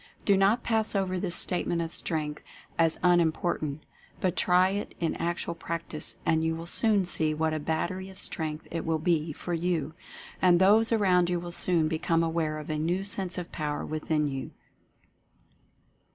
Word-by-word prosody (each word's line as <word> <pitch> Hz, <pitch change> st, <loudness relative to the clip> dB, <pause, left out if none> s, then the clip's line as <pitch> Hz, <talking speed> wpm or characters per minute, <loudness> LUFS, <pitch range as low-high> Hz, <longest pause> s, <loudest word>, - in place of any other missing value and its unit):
Do 200 Hz, -, +5 dB
not 200 Hz, +5 st, +3 dB
pass 220 Hz, -2 st, 0 dB
over 185 Hz, -2 st, 0 dB
this 180 Hz, -1 st, 0 dB
Statement 175 Hz, -1 st, +2 dB
of 165 Hz, 0 st, -3 dB
Strength 150 Hz, -2 st, -2 dB, 0.4 s
as 165 Hz, -1 st, +2 dB
un 175 Hz, -1 st, +5 dB
important, 155 Hz, -3 st, -1 dB, 0.4 s
but 185 Hz, -2 st, 0 dB
try 180 Hz, +1 st, +4 dB
it 200 Hz, +1 st, -4 dB
in 165 Hz, -2 st, 0 dB
actual 170 Hz, 0 st, -2 dB
practice 170 Hz, -2 st, -2 dB
and 160 Hz, -1 st, +2 dB
you 160 Hz, 0 st, 0 dB
will 165 Hz, +1 st, -7 dB
soon 205 Hz, +2 st, +2 dB
see 155 Hz, -3 st, +1 dB
what 160 Hz, 0 st, 0 dB
a 155 Hz, -, -1 dB
Battery 170 Hz, +5 st, -2 dB
of 190 Hz, -, -13 dB
Strength 155 Hz, -1 st, -4 dB
it 165 Hz, -1 st, -3 dB
will 160 Hz, -1 st, 0 dB
be 160 Hz, -1 st, 0 dB
for 175 Hz, +4 st, -5 dB
you. 165 Hz, -3 st, -1 dB, 0.5 s
And 180 Hz, -2 st, +5 dB
those 215 Hz, +4 st, +5 dB
around 185 Hz, -5 st, +3 dB
you 175 Hz, -1 st, 0 dB
will 175 Hz, 0 st, -7 dB
soon 170 Hz, -2 st, +2 dB
become 165 Hz, +1 st, +1 dB
aware 160 Hz, -2 st, -1 dB
of 155 Hz, 0 st, -6 dB
a 155 Hz, -, -2 dB
new 175 Hz, +5 st, 0 dB
sense 195 Hz, -2 st, -3 dB
of 175 Hz, -1 st, -5 dB
Power 150 Hz, -1 st, -3 dB
Within 155 Hz, -1 st, -1 dB
you. 135 Hz, -1 st, -4 dB
170 Hz, 180 wpm, -28 LUFS, 160-185 Hz, 0.5 s, Do